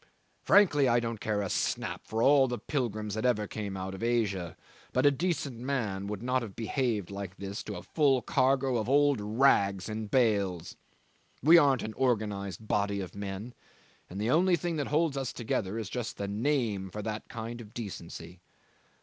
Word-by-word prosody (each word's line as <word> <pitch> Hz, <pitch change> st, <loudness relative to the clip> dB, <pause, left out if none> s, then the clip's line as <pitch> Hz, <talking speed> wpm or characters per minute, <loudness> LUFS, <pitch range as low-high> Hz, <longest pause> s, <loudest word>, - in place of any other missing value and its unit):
Frankly, 145 Hz, -9 st, +5 dB
I 120 Hz, 0 st, +4 dB
don't 115 Hz, -2 st, -3 dB
care 105 Hz, -2 st, 0 dB
a 100 Hz, -, -3 dB
snap -, -, -2 dB
for 110 Hz, +1 st, -1 dB
all 140 Hz, -1 st, +6 dB
the 120 Hz, -1 st, -3 dB
pilgrims 110 Hz, -8 st, -2 dB
that 110 Hz, +1 st, -2 dB
ever 115 Hz, -4 st, +2 dB
came 100 Hz, -1 st, -5 dB
out 95 Hz, +1 st, -4 dB
of 95 Hz, -, -8 dB
Asia, 105 Hz, -7 st, 0 dB, 0.4 s
but 130 Hz, +2 st, +2 dB
a 145 Hz, -, +7 dB
decent 140 Hz, -5 st, -2 dB
man 115 Hz, -7 st, -2 dB
would 105 Hz, +1 st, -5 dB
not 125 Hz, +1 st, +1 dB
have 110 Hz, -5 st, -7 dB
behaved 115 Hz, -4 st, -1 dB
like 100 Hz, -2 st, -6 dB
this 100 Hz, +1 st, -5 dB
to 105 Hz, -, -5 dB
a -, -, -7 dB
full 135 Hz, -6 st, +2 dB
cargo 130 Hz, 0 st, +2 dB
of 110 Hz, +1 st, -2 dB
old 145 Hz, -3 st, +4 dB
rags 105 Hz, -4 st, +2 dB
in 110 Hz, 0 st, -4 dB
bales. 100 Hz, -7 st, +1 dB, 0.7 s
We 165 Hz, +4 st, +8 dB
aren't 135 Hz, -4 st, +3 dB
an 110 Hz, -, -5 dB
organised 105 Hz, -6 st, -1 dB
body 100 Hz, -1 st, 0 dB
of 90 Hz, -3 st, -6 dB
men, 100 Hz, +4 st, -6 dB, 0.6 s
and 95 Hz, -, -6 dB
the 110 Hz, +4 st, 0 dB
only 175 Hz, +4 st, +4 dB
thing 170 Hz, 0 st, -2 dB
that 145 Hz, -, -1 dB
holds 150 Hz, -1 st, +1 dB
us 135 Hz, -2 st, -2 dB
together 110 Hz, -3 st, -2 dB
is 110 Hz, -3 st, -3 dB
just 120 Hz, +2 st, -4 dB
the 100 Hz, -, -3 dB
name 105 Hz, -3 st, 0 dB
for 105 Hz, +3 st, -6 dB
that 110 Hz, 0 st, -5 dB
kind 115 Hz, +1 st, -6 dB
of 105 Hz, -2 st, -13 dB
decency. 90 Hz, -5 st, -7 dB
110 Hz, 185 wpm, -30 LUFS, 100-130 Hz, 0.7 s, We